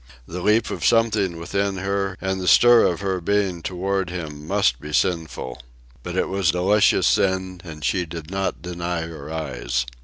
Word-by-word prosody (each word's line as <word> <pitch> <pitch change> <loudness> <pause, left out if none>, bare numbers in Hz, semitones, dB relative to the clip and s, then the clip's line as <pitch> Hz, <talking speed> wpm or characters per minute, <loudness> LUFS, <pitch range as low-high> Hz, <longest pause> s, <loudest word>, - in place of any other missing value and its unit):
The 90 +6 -6
leap 110 +4 +2
of - - -5
something 105 -6 +2
within 100 +3 -2
her 100 0 -2
and 95 0 -2
the 90 - -4
stir 120 +3 +7
of 85 0 -2
her 95 -2 -1
being 95 -2 0
toward 95 +1 -2
him 75 -4 -6
must 95 -10 +1
be 75 - -8
sinful. 80 -9 -1 0.4
But 90 0 -6
it - - +1
was 95 -2 0
delicious 95 +4 +3
sin, 95 -1 +1
and 75 -4 -8
she 90 +7 0
did 80 0 -8
not 95 0 -2
deny 85 -1 -3
her 80 -2 -8
eyes. 60 -6 -2
90 Hz, 175 wpm, -22 LUFS, 80-100 Hz, 0.4 s, stir